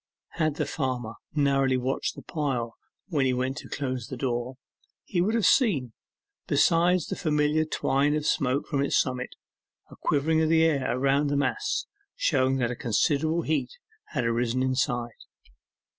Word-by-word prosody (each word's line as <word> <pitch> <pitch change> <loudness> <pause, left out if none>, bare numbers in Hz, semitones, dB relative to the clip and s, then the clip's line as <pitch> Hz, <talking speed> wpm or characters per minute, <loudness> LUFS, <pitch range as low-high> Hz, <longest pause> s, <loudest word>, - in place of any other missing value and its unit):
Had 155 -2 +1
the - - -1
farmer 125 -6 -3 0.2
narrowly 135 -3 +2
watched 130 +2 -2
the - - -10
pile 130 -7 -2 0.4
when 145 -6 +1
he 130 - +1
went 130 +2 -2
to - - -8
close 130 -4 -3
the 130 -2 -6
door, 120 0 -2 0.5
he 175 - -1
would 215 +5 +1
have 230 - +2
seen, 150 - +3 0.5
besides 175 0 +3
the - - -4
familiar 150 0 +1
twine 145 -1 +1
of 150 -1 -2
smoke 135 0 +1
from 140 - -1
its 140 - +2
summit, 130 -1 -2 0.6
a - - -11
quivering 160 +2 +1
of 160 - +2
the 160 0 +4
air 140 -6 +1
around 140 +2 +2
the 145 0 0
mass, 415 - -1 0.3
showing 135 - +2
that 120 -2 0
a - - -3
considerable 155 +7 +1
heat 155 - -1 0.3
had 125 -6 -3
arisen 120 +2 0
inside. 125 -2 0
140 Hz, 160 wpm, -27 LUFS, 130-155 Hz, 0.6 s, the